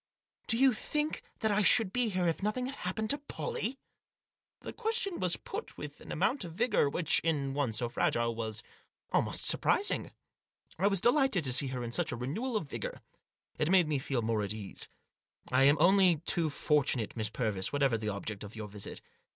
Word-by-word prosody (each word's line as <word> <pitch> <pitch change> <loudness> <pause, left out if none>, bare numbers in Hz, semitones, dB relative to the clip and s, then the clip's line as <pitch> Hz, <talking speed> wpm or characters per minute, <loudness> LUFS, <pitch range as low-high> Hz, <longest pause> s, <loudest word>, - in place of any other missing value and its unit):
Do 230 - +3
you 265 0 +5
think 300 +7 -1 0.2
that 220 -2 +2
I 205 +1 +3
should 205 -1 +6
be 245 -2 +2
here 185 -3 0
if 165 - -1
nothing 215 +5 -1
had 265 - -4
happened 215 +4 -2
to 285 - -1
Pollie?" 290 - -4 0.8
The - - -7
question 445 -4 -1
was 180 -2 0
put 435 +3 -7
with - - -8
an - - -10
amount 265 -3 0
of 170 -2 -8
vigour 210 - +2
which, 160 +2 +3
in 145 -5 -1
one 140 -4 0
so 115 +2 -1
fragile, 120 0 0
was 110 -1 -3 0.5
almost - - 0
surprising. 410 - +2 0.7
I 195 - +3
was 195 -3 +2
delighted 245 - +3
to 130 -3 +1
see 135 +2 +5
in - - -6
her 120 -2 -4
such - - 0
a - - -2
renewal 210 - -2
of 160 - -4
vigour. - - -6 0.6
It 150 - +1
made 185 -3 +5
me 150 -3 0
feel 130 -3 -2
more 110 -1 0
at 100 -1 -3
my - - -6
ease. 100 -3 -5 0.3
" - - -22
I 130 +2 +5
am 145 +2 +5
only 185 +1 +5
too 165 -2 +2
fortunate, 140 -7 0
Miss 110 -2 -2
Purvis, 105 -5 -2
whatever 140 -4 +2
the 110 -1 -2
object 100 0 -5
of 105 +2 -9
your 110 -1 -6
visit. 100 0 -6
160 Hz, 200 wpm, -31 LUFS, -, 0.8 s, should